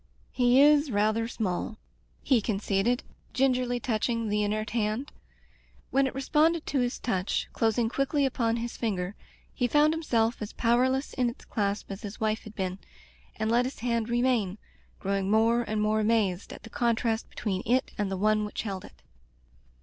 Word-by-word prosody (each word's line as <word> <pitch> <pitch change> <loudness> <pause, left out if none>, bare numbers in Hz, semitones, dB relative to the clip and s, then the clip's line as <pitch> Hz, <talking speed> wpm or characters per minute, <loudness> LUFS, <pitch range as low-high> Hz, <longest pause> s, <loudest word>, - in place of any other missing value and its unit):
"He 245 -1 +3
ts 290 +1 +6
rather 215 +1 +1
small," 215 -1 -3 0.5
he 255 -5 +3
conceded, 210 +3 0 0.3
gin 265 0 +4
gerly 245 -1 -1
touching 230 -1 -1
the 210 0 +1
inert 215 +1 -1
hand. 225 +4 -1 0.8
When 275 0 +3
it 260 - -6
re 270 - -2
sponded 320 +3 +2
to 280 - 0
his 245 0 0
touch, 190 -4 -1
closing 225 +1 +1
quickly 275 +4 +1
upon 235 -3 0
his 235 0 -4
finger, 195 -5 -2 0.4
he 245 - 0
found 300 +4 +4
himself 235 -9 0
as 210 - -5
powerless 255 +4 +1
in 250 -2 +1
its 235 - -11
clasp 200 -1 -2
as 195 - -6
his 205 -2 -7
wife 215 0 -1
had 215 0 -10
been, 185 -1 -3 0.6
and 220 +1 -1
let 240 +1 +3
his 260 - -6
hand 235 -1 0
remain, 240 -5 +1 0.4
growing 195 0 -1
more 225 +3 +4
and 215 -2 -1
more 215 +1 +2
amazed 210 -4 +1
at - - -10
the 225 - -11
contrast 230 -1 0
between 190 -4 -3
it 255 +3 +2
and 205 -2 -1
the 190 - -2
one 215 +2 +2
which 210 - -4
held 195 -4 -4
it. - - -15
225 Hz, 175 wpm, -28 LUFS, 210-250 Hz, 0.8 s, ts